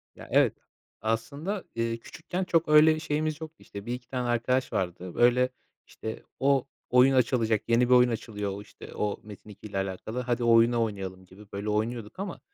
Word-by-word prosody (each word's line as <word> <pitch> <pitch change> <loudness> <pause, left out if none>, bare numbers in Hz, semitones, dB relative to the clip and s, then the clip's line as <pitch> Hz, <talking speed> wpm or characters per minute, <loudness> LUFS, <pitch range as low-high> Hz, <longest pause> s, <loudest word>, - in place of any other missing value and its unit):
Ya - - -11
evet, - - +4 0.5
aslında, 145 - -2
eee, 115 0 -1
küçükken 175 +9 -5
çok 170 -2 +2
öyle 155 +1 +7
şeyimiz 155 0 -2
yoktu 160 0 -7
işte 100 0 -10
1-2 125 0 -5
tane 125 -1 -2
arkadaş 125 +2 +1
vardı, 90 -1 -3
böyle 125 +1 +4 0.4
işte 110 0 -7 0.2
o 135 -1 +2 0.2
oyun 125 +2 +6
açılacak, 115 -4 +2
yeni 120 +1 +3
bir - - +6
oyun 125 0 +6
açılıyor, 105 -3 -3
o, 100 - -6
işte, 105 - -12
o 105 -1 -2
Metin2 105 0 -12
ile 100 - -5
alakalı, 95 +5 -3
"Hadi 120 -1 -1
o 115 - +4
oyunu 115 0 +5
oynayalım." 95 -3 -5
gibi 95 +3 -15
böyle 100 +2 -3
oynuyorduk 110 - -2
ama 195 -3 -4
120 Hz, 175 wpm, -28 LUFS, 105-130 Hz, 0.5 s, öyle